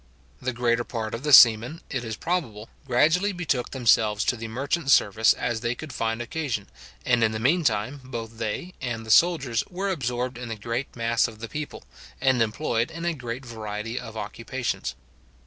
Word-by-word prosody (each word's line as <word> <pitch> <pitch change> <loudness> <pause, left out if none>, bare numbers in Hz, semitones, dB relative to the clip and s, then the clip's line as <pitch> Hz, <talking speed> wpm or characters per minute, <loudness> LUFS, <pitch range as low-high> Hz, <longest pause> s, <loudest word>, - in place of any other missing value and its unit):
The 130 - -1
greater 120 -1 +1
part 110 -2 -4
of 115 - -4
the 150 +1 -1
seamen, 120 +4 +7
it 130 -3 -2
is 110 -2 -4
probable, 120 -12 -3 0.2
gradually 165 +11 +3
betook 150 -8 -1
themselves 110 -4 +2
to - - +2
the 115 -1 -6
merchant 135 +6 -2
service 110 -3 +5
as 120 -2 -2
they 120 +1 -1
could 155 0 -8
find 115 +1 -1
occasion, 125 -7 -3 0.4
and 120 -2 +3
in 110 0 +2
the 110 - -3
mean 160 +10 +2
time 120 +2 0
both 115 -3 -7
they 175 - -3
and 115 -3 -4
the 110 - -2
soldiers 140 - +4
were 190 +3 -2
absorbed 125 -5 -2
in 125 -2 -6
the 115 - -3
great 115 +5 -4
mass 115 0 +2
of 110 - -11
the 115 +1 -6
people, 150 +5 -6 0.4
and 130 -3 +3
employed 115 +1 0
in 165 +1 -6
a 175 - +1
great 125 -2 -6
variety 110 0 -5
of 110 0 -9
occupations. 115 +4 -4
120 Hz, 185 wpm, -25 LUFS, 115-140 Hz, 0.4 s, seamen